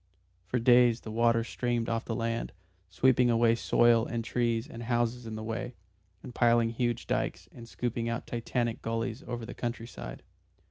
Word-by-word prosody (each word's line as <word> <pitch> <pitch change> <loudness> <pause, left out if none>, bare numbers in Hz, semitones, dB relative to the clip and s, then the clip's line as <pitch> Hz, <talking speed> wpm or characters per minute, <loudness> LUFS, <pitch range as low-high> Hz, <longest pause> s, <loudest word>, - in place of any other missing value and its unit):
For 125 - 0
days 120 0 +5
the 110 - -7
water 115 +1 +3
streamed 120 0 -2
off 115 0 -1
the 115 - -3
land, 115 +1 -2 0.4
sweeping 125 +5 +3
away 115 0 +4
soil 115 0 +4
and 115 -1 -3
trees 115 -2 0
and 115 - -9
houses 120 0 -1
in 110 - -5
the 110 - -5
way, 115 +2 -4 0.5
and 125 - -9
piling 115 -1 +3
huge 120 0 -1
dykes 90 +2 -2
and 115 -1 -12
scooping 115 -1 -2
out 115 0 -3
Titanic 120 0 -2
gullies 115 +2 -3
over 120 -2 -4
the 120 - -7
country 120 -1 -4
side. - - -9
115 Hz, 175 wpm, -29 LUFS, 115-120 Hz, 0.5 s, days